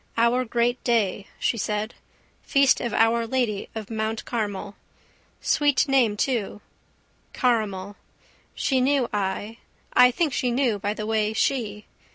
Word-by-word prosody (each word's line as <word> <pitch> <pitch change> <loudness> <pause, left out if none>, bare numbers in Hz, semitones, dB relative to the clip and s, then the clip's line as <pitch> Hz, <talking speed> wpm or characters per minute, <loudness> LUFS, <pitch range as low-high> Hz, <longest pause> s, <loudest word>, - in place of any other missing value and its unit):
Our 235 +2 +3
great 240 +1 0
day, 205 -5 0
she 230 - 0
said. 210 +2 -2 0.5
Feast 275 -1 +3
of 240 - -2
Our 230 +1 +2
Lady 230 -5 -1
of 220 0 -6
Mount 220 0 -2
Carmel. 205 -3 -3 0.7
Sweet 290 -2 +2
name 250 -6 +3
too: 225 -5 -1 0.7
caramel. 205 -6 -1 0.6
She 260 -2 +1
knew 270 -1 +2
I, 205 +2 -2 0.4
I 250 0 +7
think 295 +3 0
she 250 -1 0
knew 240 -4 +1
by 205 +2 -2
the 215 - -4
way 215 -1 0
she. 215 -3 -1
225 Hz, 135 wpm, -24 LUFS, 210-250 Hz, 0.7 s, I